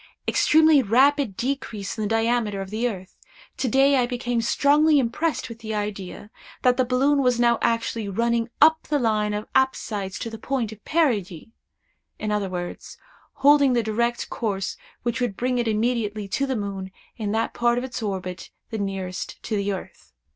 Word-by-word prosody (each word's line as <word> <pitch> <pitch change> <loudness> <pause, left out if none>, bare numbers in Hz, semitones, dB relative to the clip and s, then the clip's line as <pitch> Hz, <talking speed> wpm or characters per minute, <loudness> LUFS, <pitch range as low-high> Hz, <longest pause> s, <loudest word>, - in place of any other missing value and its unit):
Extremely 315 -2 +5
rapid 260 0 +3
decrease 235 -6 -3
in 220 - -5
the 210 - 0
diameter 225 -2 +1
of 195 0 -6
the 230 +3 0
earth. 190 -4 -9 0.4
To 265 - -1
day 270 +3 +4
I 245 -1 +2
became 245 -1 -1
strongly 295 +6 +4
impressed 275 +6 0
with 230 -2 -10
the 220 -1 -4
idea, 205 0 -5 0.3
that 250 -1 +4
the 255 - +3
balloon 275 +3 +2
was 250 -2 +2
now 235 -1 +3
actually 230 -2 0
running 235 +3 0
up 315 +1 +6
the 300 - +1
line 215 -4 +1
of 210 - -4
apsides 210 -8 0
to 230 - -4
the 225 - -8
point 245 -3 -2
of 215 -1 -12
perigee—in 215 - -3
other 205 -2 -1
words, 175 -1 -6 0.5
holding 285 -2 +6
the 240 -1 +2
direct 235 +3 -1
course 200 -5 -2 0.3
which 240 +1 -2
would 235 -6 -1
bring 250 0 0
it 235 - 0
immediately 215 -2 -1
to 275 +7 0
the 265 - -1
moon 200 -3 -4 0.3
in 210 -3 -2
that 225 +1 0
part 240 0 +2
of 245 - -1
its 250 -1 -5
orbit 185 -3 -4 0.2
the 220 - -3
nearest 190 -2 -4
to 220 - -2
the 200 0 0
earth. 190 - -8
230 Hz, 175 wpm, -24 LUFS, 205-255 Hz, 0.5 s, up